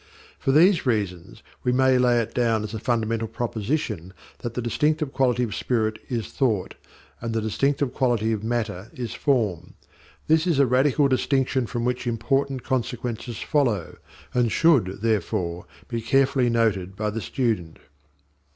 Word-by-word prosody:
For 135 - +1
these 170 +1 +5
reasons 100 -7 -2 0.2
we 125 - +2
may 130 0 +4
lay 120 -1 +4
it 115 0 -3
down 115 -3 +1
as 105 - -6
a 110 - -3
fundamental 115 -2 0
proposition 110 - -3 0.3
that 120 -1 -5
the 125 - -1
distinctive 150 +4 0
quality 125 -2 +2
of 110 -5 -3
spirit 110 -2 -1
is 115 -4 -2
Thought 110 -10 0 0.5
and 115 -1 -3
the - - +2
distinctive 135 +5 0
quality 120 -4 +1
of 110 -1 -2
matter 110 -4 -2
is 120 -4 -4
Form. 115 - 0 0.5
This 160 +2 +3
is 165 -5 +2
a 140 - +5
radical 135 +3 +3
distinction 130 -1 +1
from 120 0 -3
which 125 0 -1
important 130 +3 0
consequences 120 -3 -3
follow, 120 - 0 0.4
and 120 -2 +2
should, 110 - +3
therefore, 90 -5 -1 0.2
be 115 -2 -3
carefully 135 +1 +2
noted 105 -5 0
by 105 +1 -2
the 115 +2 -4
student. 105 -10 -2
120 Hz, 150 wpm, -24 LUFS, 110-130 Hz, 0.5 s, these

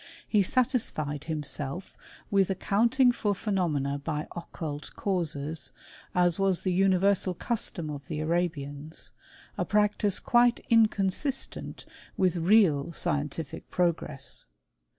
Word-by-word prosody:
He 210 - +3
satisfied 180 - 0
himself 150 +1 -4 0.4
with 195 -2 +3
account 220 +6 +1
ing 255 -2 +7
for 205 -4 -1
phenomena 155 -9 -1
by 150 -1 -2
occult 155 -3 -6
causes, 160 -6 -2 0.4
as 175 0 +3
was 195 -2 +2
the 185 - +1
uni 190 0 +4
versal 190 -1 +2
custom 175 -9 -3
of 140 -2 -8
the 155 -2 -3
Arabians; 155 -2 -2 0.5
a - - +2
practice 210 -1 +2
quite 240 0 +3
in 225 -2 +7
consistent 210 +8 -2 0.3
with 180 -2 +2
real 170 -5 +4
scientific 150 -3 -3
progress. 155 - -1
175 Hz, 115 wpm, -28 LUFS, 150-200 Hz, 0.5 s, ing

